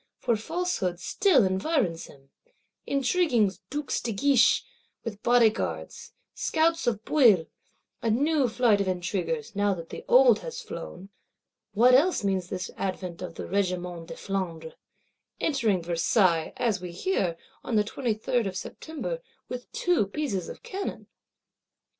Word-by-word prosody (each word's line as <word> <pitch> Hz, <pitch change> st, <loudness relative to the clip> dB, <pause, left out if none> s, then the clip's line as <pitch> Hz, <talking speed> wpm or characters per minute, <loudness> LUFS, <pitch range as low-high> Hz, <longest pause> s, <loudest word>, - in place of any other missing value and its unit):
For 235 Hz, -2 st, +1 dB
falsehood 220 Hz, -, -2 dB
still 290 Hz, -, +3 dB
environs 190 Hz, -, 0 dB
him; 135 Hz, -1 st, -18 dB, 0.6 s
intriguing 270 Hz, -, +2 dB, 0.2 s
Dukes 290 Hz, -1 st, -2 dB
de 235 Hz, -, -2 dB
Guiche, 255 Hz, +4 st, +4 dB, 0.4 s
with 210 Hz, -2 st, -6 dB
Bodyguards; 235 Hz, -3 st, +1 dB, 0.2 s
scouts 330 Hz, -1 st, +1 dB
of 220 Hz, -2 st, -1 dB
Bouillé; 225 Hz, -, +5 dB, 0.6 s
a 230 Hz, -, 0 dB
new 280 Hz, +4 st, +2 dB
flight 220 Hz, -3 st, +3 dB
of 195 Hz, -, -1 dB
intriguers, 190 Hz, +5 st, -2 dB
now 205 Hz, -1 st, +2 dB
that 165 Hz, -2 st, -9 dB
the -, -, -8 dB
old 250 Hz, -3 st, +6 dB
is 485 Hz, -, -6 dB
flown. 190 Hz, +3 st, -8 dB, 0.6 s
What 245 Hz, +4 st, +5 dB
else 300 Hz, -, +4 dB
means 190 Hz, -3 st, -1 dB
this 185 Hz, -2 st, -4 dB
advent 185 Hz, -2 st, -4 dB
of 175 Hz, -2 st, -6 dB
the -, -, -6 dB
Regiment 180 Hz, -3 st, -2 dB
de -, -, -7 dB
Flandre; 170 Hz, -5 st, -4 dB, 0.7 s
entering 225 Hz, -, +1 dB
Versailles, 170 Hz, 0 st, +2 dB
as 225 Hz, -6 st, 0 dB
we 180 Hz, -1 st, -6 dB
hear, 180 Hz, -, -1 dB, 0.3 s
on 235 Hz, -, -2 dB
the 210 Hz, -, +4 dB
23rd 225 Hz, 0 st, -1 dB
of 190 Hz, -1 st, -4 dB
September, 325 Hz, -, -5 dB, 0.3 s
with 250 Hz, -1 st, -7 dB
two 350 Hz, -, +1 dB
pieces 200 Hz, -, -3 dB
of -, -, -10 dB
cannon? 390 Hz, +1 st, -5 dB
215 Hz, 135 wpm, -27 LUFS, 185-265 Hz, 0.7 s, old